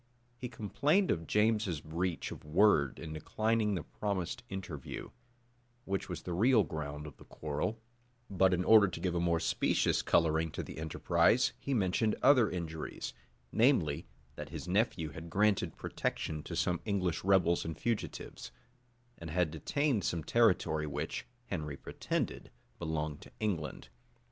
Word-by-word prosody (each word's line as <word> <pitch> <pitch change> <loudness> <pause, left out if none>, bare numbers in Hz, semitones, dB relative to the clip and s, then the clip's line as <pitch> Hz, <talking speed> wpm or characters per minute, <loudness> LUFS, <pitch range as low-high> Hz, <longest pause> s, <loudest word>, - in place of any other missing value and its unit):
He 125 +1 -6
complained 145 - +1
of 80 -1 -2
James's 105 -6 +2
breach 85 +3 -3
of - - -8
word 75 -3 +3
in 80 -2 -6
declining 110 +6 0
the 85 - -3
promised 100 +4 -3
interview, 90 -8 -6 0.7
which 95 0 -2
was - - -5
the 90 - -4
real 110 +4 +5
ground 75 -2 -5
of 75 - -10
the - - -14
quarrel;[*] 75 +9 -3 0.5
but 95 -1 +3
in 90 0 +1
order 105 0 +7
to 90 - -5
give 90 -2 -1
a 85 - 0
more 85 -1 +2
specious 80 - +2
coloring 80 0 +2
to - - -3
the - - -8
enterprise, 85 +7 +2
he 140 - -1
mentioned 105 +1 +2
other 125 -6 +6
injuries; 80 -3 -5 0.4
namely, 90 - +2 0.3
that 75 0 -6
his 80 +1 -6
nephew 90 -4 +1
had 80 +2 -8
granted 95 -2 +2
protection 75 -1 -3
to - - -6
some 90 -1 0
English 95 -5 -1
rebels 90 -3 +3
and 80 -1 -5
fugitives, 110 - -3 0.7
and 85 - -7
had 85 -1 +1
detained 140 - 0
some 85 -1 -1
territory 85 -7 +2
which, 75 +2 -4 0.2
Henry 75 -8 -4
pretended, - - -3 0.3
belonged 80 -2 -3
to - - -13
England. 95 -8 -3
90 Hz, 150 wpm, -33 LUFS, 80-105 Hz, 0.7 s, order